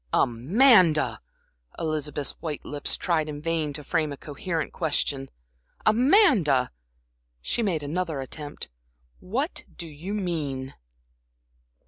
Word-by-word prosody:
"Amanda!" 170 - +4 0.6
Elizabeth's 150 -3 -2
white 155 -3 -4
lips 145 -1 -1
tried 160 -3 0
in 145 -1 -5
vain 160 -1 -1
to 150 +1 -7
frame 155 +1 0
a 140 - -6
coherent 155 +2 -4
question. 145 -4 0 0.6
"Amanda," 220 - +5 0.7
she 65 - -1
made 175 -9 0
another 160 0 -2
attempt 145 +2 -6 0.5
"what 260 - -2
do 170 - -4
you 165 +7 -6
mean?" 145 -9 -3
155 Hz, 105 wpm, -26 LUFS, 145-185 Hz, 0.7 s, Amanda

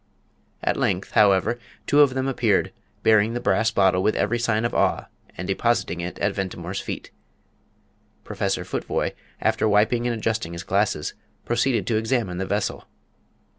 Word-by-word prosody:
At - - +1
length, - - -1
however, 100 +3 +3 0.3
two 145 - +5
of 135 -3 +4
them 130 0 0
appeared, 120 -6 +1 0.3
bearing 110 +1 +4
the - - -1
brass 110 0 +2
bottle 95 -4 +3
with 110 - +1
every 120 +1 0
sign 115 -1 +1
of 120 - -1
awe, - - +1 0.3
and 90 - -5
depositing 95 -4 0
it 90 +1 -5
at 100 0 0
Ventimore's 95 -1 -4
feet. - - -6 1.1
Professor - - -2
Futvoye, - - -2 0.3
after 110 - +1
wiping 110 +4 +2
and 120 - 0
adjusting 110 -5 -2
his 85 +2 -6
glasses, 100 -6 0 0.3
proceeded 120 +1 +1
to 115 - +1
examine 110 -5 -1
the 95 - -2
vessel. 105 +1 -2
110 Hz, 155 wpm, -24 LUFS, 95-120 Hz, 1.1 s, two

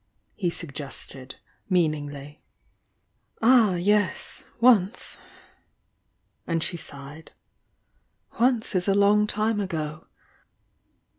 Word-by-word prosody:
he 185 -4 -1
suggested, 140 -4 -6 0.3
meaningly. 150 -5 -1 1.0
"Ah, 225 -5 +5
yes, 205 +3 0 0.2
once!" 230 -4 +3 1.3
and 165 -1 0
she 180 - -2
sighed. 145 0 -10 1.1
"Once 240 -2 +2
is 185 0 +1
a 195 - +3
long 205 +1 +4
time 215 +1 0
ago!" 155 -5 -4
180 Hz, 80 wpm, -25 LUFS, 150-210 Hz, 1.3 s, Ah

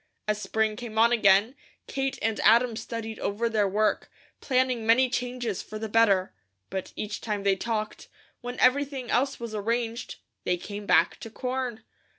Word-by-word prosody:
As 210 0 0
spring 220 0 0
came 225 -2 -7
on 230 +2 +5
again, 210 0 +4 0.3
Kate 270 0 -2
and 225 0 0
Adam 235 +1 +4
studied 225 -1 -5
over 215 +4 -1
their 215 -3 +1
work, 210 +2 0 0.3
planning 255 -3 +1
many 240 +3 +4
changes 245 -5 -2
for 215 - -8
the 220 +1 -4
better, 205 -4 +3 0.4
but 190 -1 -4
each 210 +1 -4
time 210 -3 -3
they 200 -1 +3
talked, 215 +1 -3 0.3
when 245 +1 -6
everything 265 -1 +2
else 270 +3 +1
was 235 -2 -6
arranged, 230 +2 -2 0.3
they 180 - 0
came 205 +3 -7
back 165 +1 +3
to 225 - -8
corn. 250 -1 -4
225 Hz, 160 wpm, -27 LUFS, 210-245 Hz, 0.4 s, on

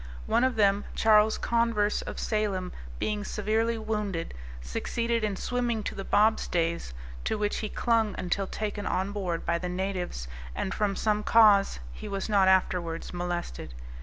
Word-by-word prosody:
One 240 - +2
of 260 -2 +2
them, 205 -1 +3
Charles 215 -1 +5
Converse, 230 -3 +1
of - - -7
Salem, 200 -4 -1 0.3
being 210 -1 -1
severely 220 +3 0
wounded, 210 -6 -3 0.3
succeeded 230 - -2
in 210 -2 0
swimming 240 0 -1
to - - -3
the 195 - -5
bobstays, 170 - +1 0.3
to - - 0
which 210 0 0
he 215 - -3
clung 225 -3 +1
until 190 +2 -1
taken 205 0 -3
on 190 +2 0
board 185 -5 -3
by 170 0 +1
the 180 +1 -3
natives, 180 - -3 0.3
and 190 - -2
from 205 -2 0
some 210 0 +1
cause 210 -3 +5 0.2
he - - -8
was 195 -1 -3
not 200 -3 +4
afterwards 180 -3 +1
molested. 175 - -4
205 Hz, 155 wpm, -28 LUFS, 180-220 Hz, 0.3 s, Charles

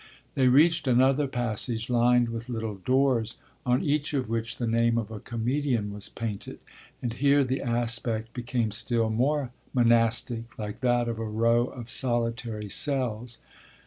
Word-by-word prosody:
They 130 -3 +3
reached 150 +4 +4
another 130 +3 +3
passage 120 -2 -2
lined 120 0 +3
with 115 +1 -6
little 110 -3 -3
doors, 125 +1 +1 0.3
on 125 +1 +2
each 150 0 0
of 130 -4 -1
which 115 +1 -3
the 120 - -2
name 115 +1 +2
of 110 -2 -3
a 110 - -6
comedian 120 -1 -1
was 105 -1 -6
painted, 110 -4 -5 0.5
and 120 -2 -2
here 140 +2 +3
the 130 +1 -2
aspect 115 -2 0
became 120 -2 -2
still 115 +1 +1
more 130 +3 0 0.2
monastic, 115 0 +2
like 105 +1 -5
that 120 -2 +1
of 115 -1 -3
a 115 - -3
row 115 +3 +2
of 120 -3 -9
solitary 115 -3 -2
cells. 120 -2 -1
120 Hz, 150 wpm, -27 LUFS, 115-130 Hz, 0.5 s, reached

